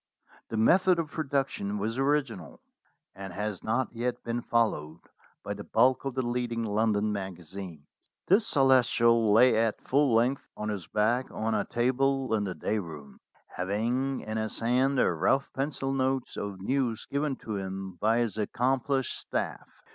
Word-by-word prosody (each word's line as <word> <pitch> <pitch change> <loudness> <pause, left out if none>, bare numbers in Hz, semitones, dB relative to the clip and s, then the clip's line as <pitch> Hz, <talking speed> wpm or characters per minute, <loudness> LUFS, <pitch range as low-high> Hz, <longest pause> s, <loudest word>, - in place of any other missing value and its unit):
The 110 - -3
method 180 - +4
of 160 -3 -3
production 135 -9 -2
was 110 +5 -2
original, 135 - -1 0.5
and 95 -1 -8
has 105 -1 -4
not 115 +3 0
yet 120 +1 -3
been 120 0 -2
followed 105 -11 0 0.5
by - - -3
the - - -8
bulk 125 +4 +2
of 135 -2 -3
the 130 -2 -1
leading 120 -1 -2
London 105 0 +1
magazines. 90 -4 -7 0.4
The 195 +4 +5
Celestial 120 - +3
lay 115 +2 +6
at 110 -1 +1
full 140 -3 +3
length 125 +4 +1
on 105 - -3
his 100 -6 -4
back 115 +5 +1
on 110 +1 -2
a 105 -2 0
table 130 +1 +1
in 105 -2 +1
the 95 -2 -4
day 110 - -1
room, 75 -7 -9 0.4
having 120 +8 -1
in 110 +1 -4
his 110 0 -3
hand 130 +4 +2
the - - +3
rough 95 - +1
pencil 135 0 -2
notes 130 -1 -1
of 100 -2 -5
news 120 +2 -1
given 140 0 -1
to 110 -4 -5
him 95 -1 -5
by 110 +4 +2
his 110 -2 -2
accomplished 130 +4 0
staff. - - -4
115 Hz, 160 wpm, -28 LUFS, 105-130 Hz, 0.5 s, lay